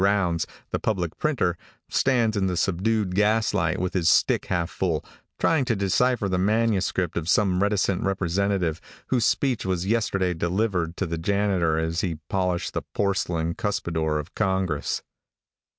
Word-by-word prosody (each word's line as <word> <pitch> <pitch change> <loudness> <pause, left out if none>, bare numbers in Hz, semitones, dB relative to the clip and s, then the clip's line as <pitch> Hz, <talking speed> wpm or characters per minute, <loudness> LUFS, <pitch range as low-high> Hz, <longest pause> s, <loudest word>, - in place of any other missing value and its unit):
Rounds, 95 -4 +2 0.2
the - - -1
public 90 -7 -1
printer, 130 - 0 0.3
stands 120 -4 +2
in 95 -2 +1
the 90 -1 -1
subdued 100 +2 0
gaslight 105 -4 +2
with 90 0 -2
his 85 -3 +2
stick - - +3
half 85 -1 -1
full, 85 -5 -1 0.3
trying 160 -4 +2
to 115 - +1
decipher 105 +3 +1
the 90 -1 0
manuscript 100 -4 +1
of 85 0 -2
some 95 -2 +3
reticent 100 -2 +1
representative, 95 -2 0 0.3
whose 125 -3 +2
speech 125 -1 +1
was 95 -1 -1
yesterday 100 -4 +1
delivered 90 0 -1
to 100 - -1
the 85 -1 -3
janitor 95 -3 +1
as 80 +1 -1
he 85 -5 -2
polished 90 -2 -1
the - - -1
porcelain 90 -4 0
cuspidor 80 -6 -1
of 75 - -6
Congress. 95 -6 -1
95 Hz, 150 wpm, -25 LUFS, 85-105 Hz, 0.3 s, stick